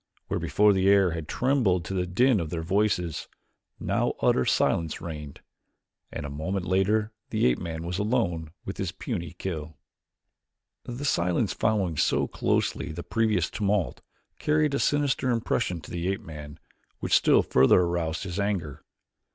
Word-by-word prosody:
Where -, -, -1 dB
before 105 Hz, 0 st, +3 dB
the 95 Hz, 0 st, +3 dB
air 100 Hz, -3 st, +5 dB
had 80 Hz, -2 st, -5 dB
trembled 115 Hz, -10 st, +1 dB
to -, -, -4 dB
the 90 Hz, -1 st, -1 dB
din 120 Hz, +5 st, +3 dB
of 80 Hz, -3 st, -3 dB
their 80 Hz, 0 st, -3 dB
voices, 90 Hz, -2 st, 0 dB, 0.5 s
now -, -, 0 dB
utter 65 Hz, -, +3 dB
silence 80 Hz, -2 st, +1 dB
reigned 75 Hz, -4 st, -7 dB, 0.7 s
and -, -, -5 dB
a -, -, -4 dB
moment 90 Hz, +6 st, -3 dB
later 105 Hz, +4 st, +1 dB, 0.2 s
the -, -, +1 dB
ape 60 Hz, -1 st, +3 dB
man 80 Hz, -1 st, -5 dB
was 90 Hz, +3 st, -3 dB
alone 100 Hz, -8 st, 0 dB, 0.2 s
with 95 Hz, -, -5 dB
his 95 Hz, -4 st, -2 dB
puny 85 Hz, -6 st, -5 dB
kill. 80 Hz, -5 st, -5 dB, 1.1 s
The 125 Hz, +4 st, -5 dB
silence 90 Hz, -9 st, +1 dB
following 100 Hz, -7 st, 0 dB
so -, -, +2 dB
closely -, -, -1 dB
the 85 Hz, +2 st, -6 dB
previous 110 Hz, -6 st, +1 dB
tumult 100 Hz, -3 st, -1 dB, 0.4 s
carried 150 Hz, -1 st, +2 dB
a 140 Hz, -, +1 dB
sinister 145 Hz, -3 st, +1 dB
impression 115 Hz, -7 st, 0 dB
to 75 Hz, -, -12 dB
the 85 Hz, 0 st, -2 dB
ape 95 Hz, 0 st, -1 dB
man, 75 Hz, -1 st, -9 dB, 0.4 s
which -, -, -3 dB
still -, -, +5 dB
further 65 Hz, +7 st, +5 dB
aroused 85 Hz, -2 st, -1 dB
his 95 Hz, 0 st, -4 dB
anger. 95 Hz, -9 st, -2 dB
90 Hz, 160 wpm, -27 LUFS, 80-105 Hz, 1.1 s, air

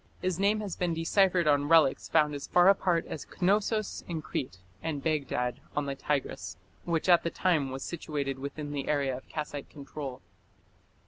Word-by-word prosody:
His 185 Hz, -1 st, -1 dB
name 205 Hz, +2 st, +2 dB
has 200 Hz, -4 st, -4 dB
been 175 Hz, -2 st, -1 dB
deciphered 175 Hz, +1 st, +3 dB
on 145 Hz, -1 st, +3 dB
relics 160 Hz, -5 st, +4 dB
found 150 Hz, -2 st, +3 dB
as 145 Hz, -, -5 dB
far 180 Hz, +1 st, +6 dB
apart 180 Hz, -4 st, +2 dB
as 150 Hz, -, -7 dB
Knossos 210 Hz, +3 st, +1 dB
in 165 Hz, -3 st, -4 dB
Crete 125 Hz, -8 st, -4 dB, 0.2 s
and 145 Hz, 0 st, -3 dB
Baghdad 140 Hz, -6 st, -1 dB, 0.2 s
on 150 Hz, -, 0 dB
the 140 Hz, -, -2 dB
Tigris, 135 Hz, -10 st, -3 dB, 0.3 s
which 170 Hz, -1 st, 0 dB
at 175 Hz, -2 st, +6 dB
the 170 Hz, -, -1 dB
time 165 Hz, -7 st, +1 dB
was 135 Hz, +1 st, -5 dB
situated 145 Hz, -5 st, -3 dB
within 145 Hz, +2 st, -5 dB
the 140 Hz, -2 st, -3 dB
area 140 Hz, -3 st, +1 dB
of 130 Hz, -, -11 dB
Kassite 150 Hz, -2 st, -5 dB
control. 140 Hz, -2 st, -7 dB
150 Hz, 175 wpm, -29 LUFS, 140-175 Hz, 0.3 s, far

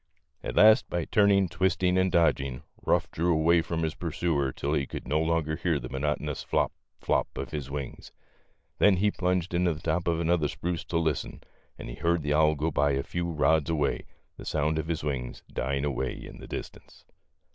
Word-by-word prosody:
At -, -, -4 dB
last 110 Hz, +1 st, +6 dB
by 85 Hz, -2 st, -1 dB
turning, 100 Hz, -2 st, +4 dB
twisting, 90 Hz, +2 st, +1 dB
and 95 Hz, 0 st, +2 dB
dodging, 70 Hz, -7 st, +1 dB, 0.2 s
Ruff -, -, +1 dB
drew 85 Hz, +2 st, +1 dB
away 85 Hz, +1 st, +4 dB
from 80 Hz, 0 st, -3 dB
his 80 Hz, -1 st, -1 dB
pursuer 80 Hz, -5 st, -1 dB
till 70 Hz, +3 st, -2 dB
he 70 Hz, -3 st, 0 dB
could -, -, -7 dB
no 75 Hz, +4 st, +1 dB
longer 80 Hz, -1 st, 0 dB
hear 85 Hz, -3 st, 0 dB
the 60 Hz, -2 st, -6 dB
monotonous 75 Hz, +1 st, -2 dB
flop, -, -, 0 dB, 0.3 s
flop -, -, +1 dB
of -, -, -5 dB
his 75 Hz, -3 st, -4 dB
wings. 70 Hz, -2 st, -6 dB, 0.7 s
Then 100 Hz, -3 st, +5 dB
he 105 Hz, +3 st, +2 dB
plunged 90 Hz, -2 st, -1 dB
into 85 Hz, -2 st, +2 dB
the -, -, -9 dB
top 85 Hz, +2 st, -1 dB
of 85 Hz, -1 st, +1 dB
an 85 Hz, 0 st, +1 dB
other 80 Hz, -4 st, +2 dB
spruce 85 Hz, +2 st, -3 dB
to 85 Hz, -, -1 dB
listen, 80 Hz, -3 st, -2 dB, 0.3 s
and -, -, -8 dB
he -, -, -6 dB
heard 85 Hz, +4 st, 0 dB
the 75 Hz, 0 st, 0 dB
owl 75 Hz, 0 st, +4 dB
go 80 Hz, +3 st, -1 dB
by 70 Hz, -1 st, +2 dB
a 70 Hz, 0 st, 0 dB
few 85 Hz, 0 st, -3 dB
rods 80 Hz, 0 st, +2 dB
away, 75 Hz, -3 st, 0 dB, 0.3 s
the -, -, -10 dB
sound 80 Hz, +1 st, 0 dB
of 80 Hz, -, -4 dB
his 80 Hz, -2 st, -2 dB
wings 65 Hz, -5 st, -4 dB
dying 70 Hz, +2 st, -1 dB
away 65 Hz, -3 st, -1 dB
in -, -, -10 dB
the -, -, -10 dB
distance. -, -, -9 dB
80 Hz, 200 wpm, -28 LUFS, 75-85 Hz, 0.7 s, last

